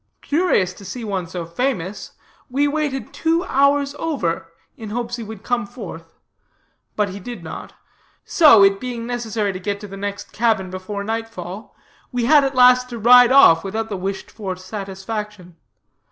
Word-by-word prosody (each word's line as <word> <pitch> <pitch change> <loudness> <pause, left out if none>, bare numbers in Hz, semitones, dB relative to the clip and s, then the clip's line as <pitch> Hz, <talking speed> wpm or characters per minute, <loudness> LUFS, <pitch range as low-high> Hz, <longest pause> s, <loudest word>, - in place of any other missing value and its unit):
Curious 290 - +1
to 200 - -14
see 230 +6 -7
one 195 -5 -3
so 175 0 -5
famous, 195 0 -3 0.4
we 280 +3 +1
waited 290 -2 -2
two 330 +2 +1
hours 280 -1 +2
over, 175 - -2 0.2
in 220 -2 -8
hopes 240 +2 -3
he 235 - -6
would 220 -2 -9
come 240 -4 -1
forth; 180 -8 -10 0.8
but 210 -2 0
he 190 +2 -7
did 240 +4 -8
not. - - -8 0.5
So, 290 - +7
it 195 0 +4
being 245 -2 -5
necessary 225 -4 -2
to 185 - -6
get 200 +1 -3
to 210 - -7
the 195 0 -9
next 200 0 -5
cabin 215 -5 0
before 185 +2 -5
nightfall, 215 -3 -6 0.4
we 245 -2 -1
had 295 +2 +6
at 270 0 -1
last 250 0 +5
to 240 - -6
ride 245 +2 +7
off 215 -12 +7
without 220 +3 -3
the 205 - -3
wished 190 +1 -5
for 195 -4 -5
satisfaction. 195 0 -7
220 Hz, 170 wpm, -21 LUFS, 195-250 Hz, 0.8 s, So